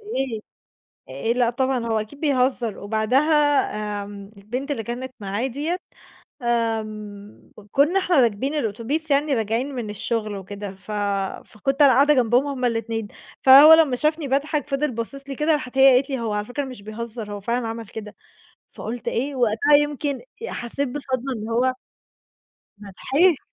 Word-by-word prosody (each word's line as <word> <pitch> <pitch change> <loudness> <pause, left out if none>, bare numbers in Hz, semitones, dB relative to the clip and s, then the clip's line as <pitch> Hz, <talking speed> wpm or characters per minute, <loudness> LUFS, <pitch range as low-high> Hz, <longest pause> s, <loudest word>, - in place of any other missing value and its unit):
إيه 270 - -3 0.7
آآ، 135 - -1
لأ، 240 -1 +2
طبعًا 260 -1 -1
هو 225 -1 +1
أكيد 215 +7 -9
بيهزّر 255 -6 +1
وبعدها 220 +6 +1 0.8
آمم 200 0 -10
البنت 245 +8 -5
اللي 260 -6 -2
كانت 250 +3 -6
معاه 205 +5 -2
دِيّة 295 +7 -2 0.6
آمم، 215 -3 -3
ك - - -11
كنّا 310 +8 +3
إحنا 360 -2 +1
راكبين 240 +4 +1
الأوتوبيس 280 +5 -2
يعني 285 +1 +2
راجعين 230 +5 -1
من 235 -4 -4
الشُغل 215 0 -3
وكده 200 +1 -7
ف 190 +3 -10 0.5
فكنت 270 +7 -1
أنا 280 -2 +7
قاعدة 285 +3 +5
جنبهم 250 +1 +3
هُم 270 -3 -3
الإتنين، 225 -2 -1 0.3
فهو 275 +4 +10
لمّا 310 -6 +4
شافني 305 +2 0
باضحَك 290 +2 0
فضِل 275 +1 0
باصص 270 +5 -6
لي 275 - -5
كده، 300 +3 +2
راحت 265 -3 -4
هي 265 -1 +8
قالت 270 +3 +2
لي: 265 -2 -2
"هو 225 -2 -2
على 210 0 -2
فكرة 280 +5 -3
مش 255 -6 -9
بيهزّر، 220 0 -6
هو 205 - -5
فعلًا 235 +3 -1
عمل 225 0 -6
كده." 210 +1 -9 0.6
فقُلت 235 +2 -5
إيه 275 +5 -2
وقتها، 245 +4 +3
يمكن 290 -1 -1 0.2
آآ 470 - -5
حسّيت 265 +4 -3
بصدمة 265 -1 -3
إن 220 -1 -6
هو 255 +3 +2 1.1
أنا 205 -1 -10
ضحِكت 295 - +2
245 Hz, 165 wpm, -23 LUFS, 220-280 Hz, 1.1 s, فهو